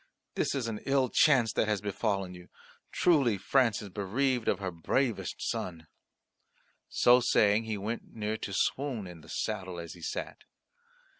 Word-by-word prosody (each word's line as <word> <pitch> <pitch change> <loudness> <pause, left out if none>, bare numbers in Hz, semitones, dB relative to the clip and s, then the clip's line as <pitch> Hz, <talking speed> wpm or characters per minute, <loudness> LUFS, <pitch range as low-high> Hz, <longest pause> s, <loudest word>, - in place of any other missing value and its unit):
"This - - 0
is 130 -4 -1
an 110 -2 -4
ill 135 -2 +2
chance 130 -6 +4
that - - +1
has 105 -2 +1
befallen 100 -2 -2
you. 90 0 -13 0.4
Truly 140 - +3
France 115 +3 +2
is 100 - -8
bereaved 115 +6 -1
of - - +2
her 95 -1 -4
bravest 95 +3 -1
son." 85 -3 -4 1.0
So 125 +1 +5
saying 110 -2 +3
he 110 -1 -3
went 110 +4 -5
near 110 0 -2
to 100 - -6
swoon 130 +1 -1
in 90 -3 -10
the - - -16
saddle 95 -4 -3
as 85 -1 -7
he 85 - -14
sat. - - -5
105 Hz, 160 wpm, -30 LUFS, 95-125 Hz, 1.0 s, So